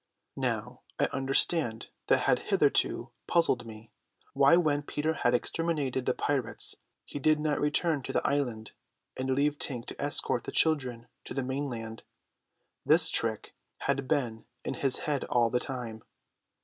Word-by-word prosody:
Now - - -2 0.2
I - - +4
understand 135 -2 +1 0.2
what - - +4
had - - +3
hitherto - - +2 0.2
puzzled 130 -8 +2
me, 110 0 -11 0.4
why 140 +4 +6
when 150 -4 +2
Peter 150 +2 -2
had 120 -5 +1
exterminated 145 -3 -1
the 125 - +2
pirates 135 -6 0 0.3
he 145 - -6
did 155 +2 +3
not 150 -1 0
return 150 0 +1
to 130 - -5
the - - -1
island 125 -7 -1 0.4
and 130 +1 -3
leave 145 +2 +1
Tink 125 -4 -2
to - - -8
escort 140 -3 -1
the - - -5
children 130 -7 +1 0.2
to - - -7
the 135 - -1
mainland. 125 -4 -4 0.8
This 160 +1 +6
trick 110 -2 0 0.3
had 140 -1 -1
been 120 -7 -1 0.2
in - - -2
his 135 -2 +2
head 145 -3 0
all 120 -2 +2
the 125 - +2
time. 120 -5 -6
135 Hz, 150 wpm, -29 LUFS, 120-150 Hz, 0.8 s, why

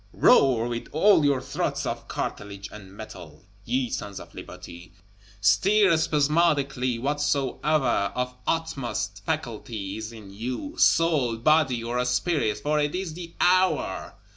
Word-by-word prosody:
Roar 120 -4 +4
with 120 -1 -4
all 190 +2 +5
your 140 -2 +3
throats - - -2
of - - -4
cartilage 100 -1 -5
and 95 -3 -11
metal, 95 -7 -11 0.2
ye 125 +2 0
Sons 100 -3 -5
of - - -13
Liberty; 85 0 -11 0.5
stir 190 - +4
spasmodically 145 -5 +1
whatsoever 140 -3 0
of 125 0 -2
utmost 120 -10 -2
faculty 110 -9 -4
is 110 +1 -6
in 110 -4 -12
you, 125 - -5
soul, 155 - +3
body, 130 -2 +2
or 120 +2 -1
spirit; 125 -2 0
for 150 +8 0
it 145 +1 0
is 180 -3 -3
the 170 0 -9
hour! 185 +1 +1
125 Hz, 130 wpm, -25 LUFS, 110-155 Hz, 0.5 s, all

